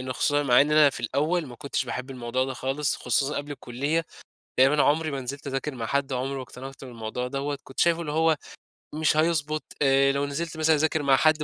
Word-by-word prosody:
لإنّه 130 0 -4
خصوصًا 145 +2 +1
مع 125 -2 +5
إن 145 +2 +3
أنا 150 -2 +6
في - - -7
الأول 155 +4 0
ما 120 - -10
كنتش 140 -2 -2
باحب 125 +2 -5
الموضوع 125 0 -2
ده 130 0 -4
خالص، 135 +3 -1
خصوصًا 135 +4 0
قبل 145 +1 -4
الكُلّية، 145 +6 -2 0.5
تقريبًا 135 +3 +5
عمري 155 +1 +2
ما 135 -1 -3
نزلت 140 +3 -6
أذاكر 135 +1 -3
مع 115 -2 -4
حد، 140 0 -1
عمري 130 +2 -2
ما 130 - -4
اقتنعت 135 +2 -10
بالموضوع 120 0 -5
دوّة، 140 +1 -3
كنت 130 - -6
شايفه 170 -1 +3
اللي 150 -3 -4
هو 160 0 +3 0.6
مش 155 0 +2
هيضبط، 155 -1 +1 0.2
آآ 135 0 +4
لو 140 +1 0
نزلت 160 +3 -4
مثلًا 160 0 +4
أذاكر 155 0 +1
مع 135 -1 +5
حد 155 +1 +3
140 Hz, 215 wpm, -26 LUFS, 130-155 Hz, 0.6 s, أنا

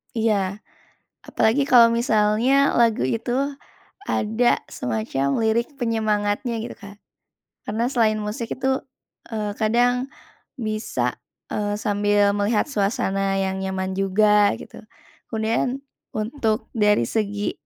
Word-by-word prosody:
Iya, 205 -3 0 0.7
apalagi 270 +6 +2
kalau 235 -3 +7
misalnya 235 +4 +3
lagu 230 - +3
itu 225 - -2 0.8
ada 225 - +1
semacam 125 - -2
lirik 225 +1 +1
penyemangatnya 220 0 0
gitu, 225 - -6
Kak. 200 0 -13 0.7
Karena 220 +3 0
selain 220 -4 +2
musik 215 +2 -4
itu, 265 0 0 0.5
eee, 210 -2 -3
kadang 245 +4 +2 0.5
bisa, 215 - -2 0.3
eee, 205 0 -1
sambil 205 -1 +2
melihat 205 +2 +1
suasana 195 -2 0
yang 190 0 -1
nyaman 190 0 -3
juga 205 +2 +3
gitu. - - -11 0.5
Kemudian, 230 +5 -1 0.3
untuk 220 +1 -2
dari 210 - +3
segi 205 - -2
215 Hz, 105 wpm, -23 LUFS, 205-230 Hz, 0.8 s, kalau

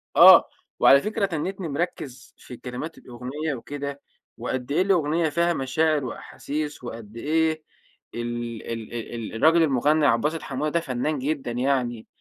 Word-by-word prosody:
آه، - - +9 0.3
وعلى 140 - +7
فكرة 215 +2 -1
تنِّتني 185 +1 -3
مركِّز 140 -5 -4
في 125 - -11
كلمات 130 +6 -6
الأغنية 130 +5 -5
وكده 140 +2 -6 0.4
وقد 130 +1 -4
إيه 155 - +3
الأغنية 170 -4 +2
فيها 170 +3 +1
مشاعر 150 +1 +1
وأحاسيس 145 +4 -5
وقد 115 -2 -8
إيه 155 +3 0 0.5
ال 120 -1 -4
ال 115 -1 -6
ال 120 0 -5
ال 115 -1 -6
الراجل 165 +7 +5
المُغنّى 150 +2 +2
عبد 115 -2 +3
الباسط 155 +2 -1
حموده 155 - -2
ده 170 - +2
فنان 140 0 -2
جدًا 140 -2 -2
يعني. 120 -2 -1
140 Hz, 145 wpm, -25 LUFS, 120-160 Hz, 0.5 s, آه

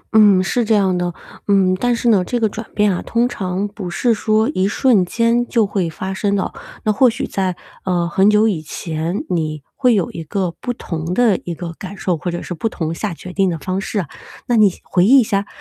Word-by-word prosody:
嗯， 200 -4 +6
是 240 +5 0
这 220 0 +2
样 190 -3 +2
的， 175 0 -1 0.4
嗯， 190 -2 +3
但 245 +1 +2
是 240 - -2
呢， 200 -5 +4
这 245 +6 -2
个 225 - +3
转 220 +2 -7
变 210 -2 +3
啊 180 - -3
通 235 +1 +1
常 190 -3 -3
不 205 -3 -7
是 230 +7 +1
说 215 +1 +1
一 185 +1 +1
瞬 220 -1 +3
间 230 +5 +1
就 230 -3 +2
会 195 -4 -1
发 190 +4 -5
生 200 +1 0
的。 195 - -2 0.3
那 215 - +3
或 255 +3 +5
许 230 - -3
在， 185 -2 -2 0.3
呃， 175 -2 0
很 190 +4 +3
久 210 +1 +4
以 185 -8 -1
前， 160 - -4
你 155 -4 -2
会 250 -4 +3
有 190 -5 0
一 165 - -6
个 180 +1 -2
不 245 - -2
同 165 -7 -4
的 235 -6 +4
一 175 - -4
个 170 0 -6
感 195 +1 -7
受， 185 -2 0
或 165 +3 -4
者 175 0 -4
是 - - -5
不 200 +7 -2
同 160 -5 -3
下 195 +3 -3
决 180 +2 -9
定 190 0 +2
的 170 - -2
方 185 +5 -3
式 205 - -2
啊。 170 - -7 0.4
那 240 - +2
你 210 -3 +5
回 175 - +1
忆 260 +8 +7
一 - - +4
下， 200 -2 -1
195 Hz, 255 characters per minute, -19 LUFS, 180-220 Hz, 0.4 s, 忆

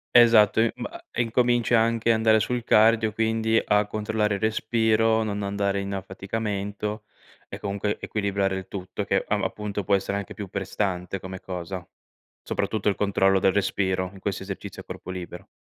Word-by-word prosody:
Esatto, 115 -3 +7
ehm, 115 0 +3
ma 340 +2 -7
e - - -1
incominci 120 0 +2
anche 115 0 +3
andare 110 -1 +4
sul 125 0 -2
cardio, 110 0 +4
quindi 110 0 +1
a 105 0 +3
controllare 105 0 -1
il - - -6
respiro, 110 0 +2
non 105 -1 -3
andare 100 0 -1
in 100 0 -4
affaticamento 100 +2 -4 0.4
e - - -8
comunque 100 +1 -2
equilibrare 100 -2 -1
il 95 0 -7
tutto, 95 -1 -5
che - - +1
am - - +1
appunto 105 -2 -4
può 100 - +4
essere 100 +1 -1
anche 100 -2 -6
più 100 -3 -7
prestante 95 -1 -3
come 95 0 -7
cosa, 90 -1 -6 0.6
soprattutto 105 -2 -1
il 100 - 0
controllo 95 -1 +2
del 95 0 +3
respiro 95 -2 0
in 95 - -12
questo 95 0 -3
esercizio 95 0 -7
a - - -16
corpo 95 - -7
libero. 90 -2 -7
105 Hz, 170 wpm, -25 LUFS, 95-110 Hz, 0.6 s, Esatto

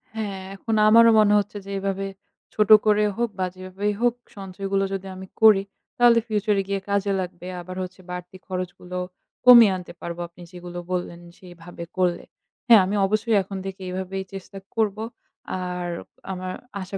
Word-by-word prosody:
হ্যাঁ, 205 -3 -4
এখন 220 +3 -2
আমারও 230 +1 +7
মনে 210 -1 +5
হচ্ছে 205 +1 -4
যে - - -10
এইভাবে 195 0 -2 0.5
ছোট 210 -2 +1 0.2
করে 210 0 +4
হোক 235 0 0
বা 185 - +2
যেভাবেই 185 +3 -3
হোক 240 -1 +3 0.2
সঞ্চয়গুলো 195 0 -2
যদি 195 0 -4
আমি 190 0 -9
করি, 215 -3 +7 0.3
তাহলে 240 -1 +6
future 210 -1 +1
এ - - -5
গিয়ে 200 0 -1
কাজে 200 0 +1
লাগবে। 180 -1 -6
আবার 185 +1 -8
হচ্ছে 185 0 -9
বাড়তি 180 +1 -7
খরচগুলো 180 -1 -5 0.5
কমিয়ে 235 -5 +9
আনতে 180 -1 -10
পারবো 170 0 -6
আপনি 170 +1 -18
যেগুলো 175 0 -8
বললেন 175 -1 -3 0.2
সেইভাবে 175 -1 -11
করলে। 175 -2 +1 0.4
হ্যাঁ, 230 -4 +8
আমি 200 - -2
অবশ্যই 215 +2 +1
এখন 195 +1 -7
থেকে 190 0 -7
এইভাবেই 190 +1 -4
চেষ্টা 195 +1 -9 0.2
করবো। 215 -1 0 0.6
আর 180 -1 -4 0.4
আমার 185 0 -4 0.3
আশা 190 +1 -5
195 Hz, 165 wpm, -24 LUFS, 180-210 Hz, 0.6 s, কমিয়ে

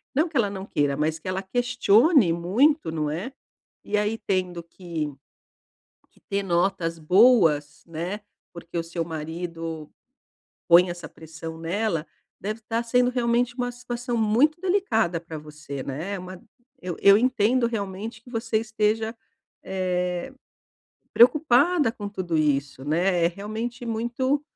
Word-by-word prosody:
não 310 +5 +3
que 315 - -19
ela 210 -4 +2
não 195 -1 -6
queira, 145 -6 0
mas 155 +2 0
que 160 - -11
ela 185 +1 -2
questione 245 - +3
muito, 220 - +2
não 155 -2 -1
é. 185 - -4 0.5
E 210 - -1
aí 210 +2 0
tendo 185 -4 -2
que 165 -3 -5 1.0
que - - -27
ter 200 0 0
notas 175 -2 0
boas, 165 -5 +4
né, 170 +5 -4 0.3
porque 170 0 -6
o - - 0
seu 165 0 -4
marido 165 0 -6 0.8
põe 175 +1 +7
essa 175 0 -7
pressão 160 +1 -9
nela, 170 0 -1 0.3
deve 215 +3 -4
estar 225 +1 -2
sendo 245 +1 +3
realmente 240 0 +1
uma 245 -1 -2
situação 245 0 -4
muito 245 +10 +2
delicada 355 - +1
pra 165 -1 -8
você, 150 -2 -8
né. 165 +9 -4
Uma 185 0 -9 0.4
eu 180 -2 -4
eu 200 0 +8
entendo 245 0 +2
realmente 215 0 -5
que 245 - -16
você 225 -2 -1
esteja, 220 0 -1 0.5
eh, 180 +3 -2 0.8
preocupada 285 +2 +4
com 205 -3 -6
tudo 185 -5 -3
isso, 140 -3 0
né. 170 +3 +1
É - - +3
realmente 220 +6 -5
muito, 240 +5 -1
195 Hz, 140 wpm, -25 LUFS, 165-235 Hz, 1.0 s, eu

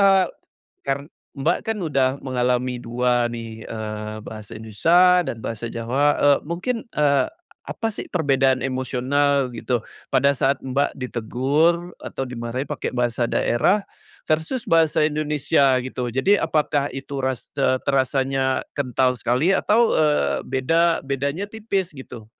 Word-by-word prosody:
eee, 195 -1 +5 0.6
kar 135 0 0 0.4
Mbak, 145 +4 +1
kan 225 -1 -1
udah 140 -6 +2
mengalami 125 -1 0
2 120 0 0
nih, 115 -1 -7
eee, 110 -1 -5
bahasa 110 -1 -9
Indonesia 175 - +4
dan 115 - -4
bahasa 115 +1 -4
Jawa, 120 +5 -1 0.2
eee, 145 -1 +5
mungkin, 185 +9 -3
eee, 145 -2 +3 0.4
apa 225 -1 -2
sih - - -7
perbedaan 135 -6 +2
emosional 130 +1 0
gitu 120 0 -2 0.2
pada 140 +2 +3
saat 135 0 +1
Mbak 135 +2 0
ditegur 140 +8 0
atau 135 - -4
dimarahin 125 +1 -4
pakai 150 - -3
bahasa 120 -1 -1
daerah 195 - +2 0.4
versus 160 +11 -1
bahasa 165 -5 +3
Indonesia 150 -3 +2
gitu? 125 -1 -3
Jadi 130 - +2
apakah 150 -3 +1
itu 135 0 -5
ras 130 -1 -2
te 135 -2 +2
terasanya 135 -1 +1
kental 130 -2 +1
sekali 125 +9 +1
atau, 225 +4 +3
eee, 150 - +2
beda 165 +6 +2
bedanya 140 +7 -2
tipis 205 -4 -3
gitu 130 -5 -10
135 Hz, 130 wpm, -22 LUFS, 125-155 Hz, 0.6 s, eee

